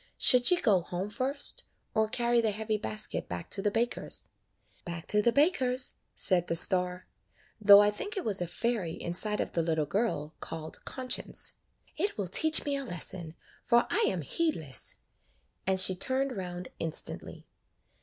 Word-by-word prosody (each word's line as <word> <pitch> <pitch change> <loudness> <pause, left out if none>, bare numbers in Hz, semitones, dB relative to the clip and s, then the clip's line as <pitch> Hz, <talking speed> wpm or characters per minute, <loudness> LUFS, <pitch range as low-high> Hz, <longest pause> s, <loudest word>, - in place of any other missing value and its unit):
Should 250 -2 +5
she 360 - +5
go 205 - +2
home 180 +4 -5
first, 280 - -2 0.3
or 220 -1 +1
carry 235 +1 +1
the 225 - 0
heavy 215 +1 -3
basket 215 +1 -5
back 90 0 -7
to 195 - -3
the 205 - +1
baker's?" 230 +3 -2 0.5
"Back 170 -2 -7
to 210 - +2
the 235 - +2
baker's," 260 -4 +1 0.2
said 180 -3 +2
the 170 - -1
star, 180 +1 +6 0.5
though 205 -1 +8
I 205 0 +3
think 410 - -7
it 380 - -4
was 200 -4 -1
a 175 - -2
fairy 185 -2 -3
inside 210 +5 0
of - - -3
the 170 - -1
little 160 -2 -1
girl 155 -4 -2
called 160 -1 -7
Conscience. 255 -1 0 0.4
"It 390 - -2
will 195 -4 -4
teach 315 - +6
me 285 -1 -1
a 275 - -3
lesson, 175 - -4 0.3
for 235 0 +2
I - - +2
am 185 -3 -2
heed 325 - -1
less;" 145 -5 -4 0.7
and 190 0 +2
she 185 0 +5
turned 260 +7 -2
round 180 -2 -7
instantly. 165 -1 -1
210 Hz, 170 wpm, -29 LUFS, 175-245 Hz, 0.7 s, though